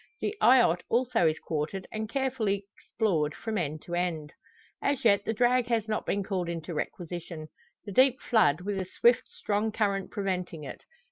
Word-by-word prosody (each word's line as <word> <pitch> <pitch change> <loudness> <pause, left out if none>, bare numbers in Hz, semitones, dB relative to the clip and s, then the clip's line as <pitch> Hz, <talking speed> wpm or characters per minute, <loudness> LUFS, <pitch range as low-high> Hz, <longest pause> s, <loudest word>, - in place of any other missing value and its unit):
The 420 - -2
eyot 235 -9 +5
also 240 -7 +2
is 155 0 +1
quartered, 160 +5 -3
and 215 0 -4
carefully 230 -7 -1
explored 160 -9 -1
from 225 -1 -4
end 155 -2 -3
to 175 - -8
end. 170 -4 -2 0.5
As 280 -3 0
yet 200 -2 +4
the - - 0
drag 245 +2 +2
has 225 -3 0
not 215 - -2
been 200 0 0
called 185 -3 -2
into 170 0 -5
requisition; 165 0 -5 0.4
the 205 - -6
deep 260 +4 +4
flood, 175 -9 +3
with 195 0 -2
a 185 - -5
swift, 240 0 +4
strong 210 +1 -1
current 200 -3 0
preventing 180 -5 -3
it. 140 - -9
195 Hz, 175 wpm, -28 LUFS, 170-225 Hz, 0.5 s, eyot